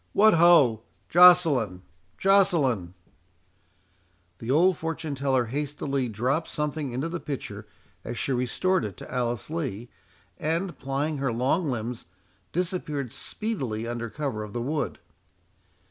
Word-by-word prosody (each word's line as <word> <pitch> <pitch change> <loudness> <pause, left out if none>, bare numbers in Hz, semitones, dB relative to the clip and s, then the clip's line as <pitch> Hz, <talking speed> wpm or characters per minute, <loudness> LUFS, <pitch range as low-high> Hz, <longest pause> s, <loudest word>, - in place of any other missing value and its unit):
—What, 215 +2 +6
ho!—Joceline—Joceline!" 140 - +3 1.5
The 115 - -7
old 175 +7 +4
fortune 160 -1 -4
teller 135 -2 +1
hastily 140 0 -2
dropped 130 +9 -1
something 150 -2 -3
into 130 +6 -2
the 170 +1 -4
pitcher 110 -8 -6 0.4
as 120 0 -5
she 135 - -2
restored 130 +8 +1
it 105 -4 -5
to - - -10
Alice 120 +1 -2
Lee, 125 -8 -4 0.5
and, 170 +4 -1
plying 140 +2 -2
her 135 -3 0
long 130 +9 +1
limbs, 120 -1 -4 0.5
disappeared 155 - -2
speedily 130 - -4
under 120 -1 -4
cover 135 -5 -3
of 105 -1 -7
the 120 - -2
wood. 150 +4 -2
135 Hz, 115 wpm, -26 LUFS, 120-165 Hz, 1.5 s, What